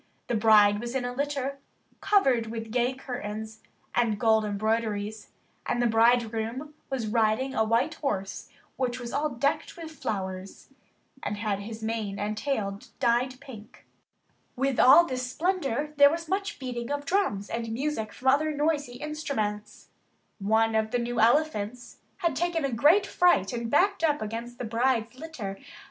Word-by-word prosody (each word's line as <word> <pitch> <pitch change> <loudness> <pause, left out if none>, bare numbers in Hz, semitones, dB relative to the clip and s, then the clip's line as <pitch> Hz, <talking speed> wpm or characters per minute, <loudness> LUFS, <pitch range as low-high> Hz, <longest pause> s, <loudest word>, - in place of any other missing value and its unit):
The - - -3
bride 210 -2 +5
was 240 +3 -5
in 255 -2 -1
a 245 - -3
litter 275 0 -2 0.4
covered 265 - +3
with 225 0 -6
gay 245 +2 +1
curtains 220 -4 -6 0.3
and 225 -4 +1
gold 220 -1 +4
embroideries, 215 0 -2 0.4
and 240 - 0
the 240 - +2
bridegroom 230 +4 +1 0.2
was 260 -4 -2
riding 225 +4 +1
a 220 - +2
white 235 +8 +1
horse 195 -9 -4 0.3
which 250 -1 -1
was 240 -1 -6
all 295 +2 0
decked 280 +7 -1
with 325 -2 -8
flowers, 190 -9 -5 0.5
and 210 - -3
had 205 -2 -1
his 220 +2 -8
mane 220 -3 -2
and 210 +1 -2
tail 210 -6 -2 0.2
dyed 250 +2 +1
pink. 235 -7 -13 0.7
With 270 0 0
all 285 +7 +8
this 255 -3 -3
splendour 300 -5 -1
there 285 0 +8
was 335 +2 -3
much 395 +3 -2
beating 245 -3 -5
of 290 0 -3
drums 280 - 0
and 230 -1 -4
music 235 -3 -2
from 265 - 0
other 300 +3 +3
noisy 295 -3 0
instruments. 250 -7 -4 0.5
One 220 +3 +2
of 220 0 +1
the 245 - 0
new 240 0 -2
elephants 240 -2 +1 0.2
had 340 -7 0
taken 335 -1 0
a 275 - -1
great 305 - +4
fright 355 - +3
and 235 -1 -3
backed 375 - +2
up 300 -2 +2
against 230 +3 -5
the - - -4
bride's 235 +1 0
litter. 240 -12 -6
240 Hz, 155 wpm, -27 LUFS, 220-285 Hz, 0.7 s, all